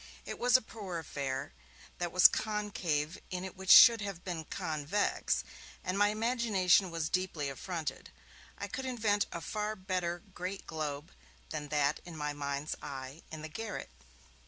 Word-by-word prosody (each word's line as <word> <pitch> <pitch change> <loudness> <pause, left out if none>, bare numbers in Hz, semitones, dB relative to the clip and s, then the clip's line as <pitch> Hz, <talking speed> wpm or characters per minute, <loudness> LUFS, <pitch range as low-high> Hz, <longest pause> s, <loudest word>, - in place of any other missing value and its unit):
It - - -6
was 250 +1 +6
a 255 - -7
poor 200 -6 -6
affair; 135 - -4 0.5
that 175 -1 -1
was 185 - +9
concave 190 -7 -1
in 180 -1 -3
it 190 - -7
which 190 0 -7
should 230 -3 +10
have 195 -4 -5
been 170 -4 -4
convex, 155 +8 -1 0.4
and 185 - -1
my 205 +1 +5
imagination 210 -4 +3
was 165 -2 -2
deeply 175 -6 -1
affronted. 155 -1 -5 0.5
I - - -4
could 265 - -5
invent 215 -5 +1
a 170 - -5
far 210 +5 -2
better 185 -3 -2
Great 185 +2 -5
Globe 150 -1 -4 0.4
than 150 -2 -4
that 145 0 +1
in 170 -3 -9
my 150 -1 -2
mind's 140 +1 -3
eye 135 +3 -7
in 155 -1 -7
the - - -4
garret. 215 - -6
175 Hz, 160 wpm, -32 LUFS, 150-205 Hz, 0.5 s, should